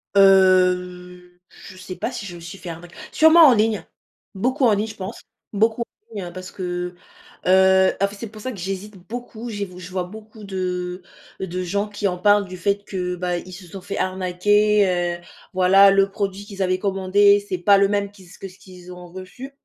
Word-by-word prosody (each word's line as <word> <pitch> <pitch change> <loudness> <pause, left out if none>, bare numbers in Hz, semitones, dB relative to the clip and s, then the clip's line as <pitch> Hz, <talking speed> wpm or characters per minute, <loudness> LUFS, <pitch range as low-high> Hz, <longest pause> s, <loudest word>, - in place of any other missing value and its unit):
Heu, 180 -2 +3
je 185 - -14
sais 185 0 -8
pas - - -3
si 215 - -6
je 180 -3 -8
me 170 - -10
suis 175 +4 -9
fait 180 - -8
arnaqu 170 +1 -10 0.2
sûrement 320 +1 +7
en 260 - +6
ligne. 215 -1 +1 0.5
Beaucoup 255 +7 0
en 225 - +5
ligne 205 +2 -1
je 215 - -9
pense, 195 +3 -7 0.3
beaucoup 220 +3 +1
en - - -1 0.3
ligne 180 -4 -5
parce 185 0 -8
que, 180 -1 -4 0.5
heu, 190 0 +5
en 200 - +2
fait 200 - -11
c'est 225 +3 -7
pour 215 0 -12
ça 255 - -4
que 210 - -9
j'hésite 195 +3 -5
beaucoup, 240 0 -7
je 205 -2 -4
vi 180 -1 -12
je 180 0 -10
vois 185 -1 -2
beaucoup 215 +3 -12
de 180 -2 -4 0.4
de 185 -1 -4
gens 200 +4 -1
qui 205 -1 -2
en 180 -1 -2
parlent 205 +1 +4
du 185 0 -8
fait 200 +3 -1
que, 180 -2 -3
bah, 180 0 -2
ils 185 +1 -11
se 180 +1 -10
sont 190 +3 -9
fait 200 - -6
arnaquer, 185 -1 +1
heu, - - -21 0.3
voilà 190 +2 +6
le 195 0 +3
produit 200 0 -4
qu'ils 200 -1 -8
avaient 185 0 +1
commandé, 200 +1 +3
c'est 185 - -2
pas 200 +3 +4
le 200 - +4
même 200 0 -1
qu'ils 190 -3 -17
que 195 - -8
ce 185 0 -17
qu'ils 180 -1 -13
ont 180 -1 -12
reçu. 190 +9 -10
190 Hz, 210 wpm, -22 LUFS, 180-205 Hz, 0.5 s, sûrement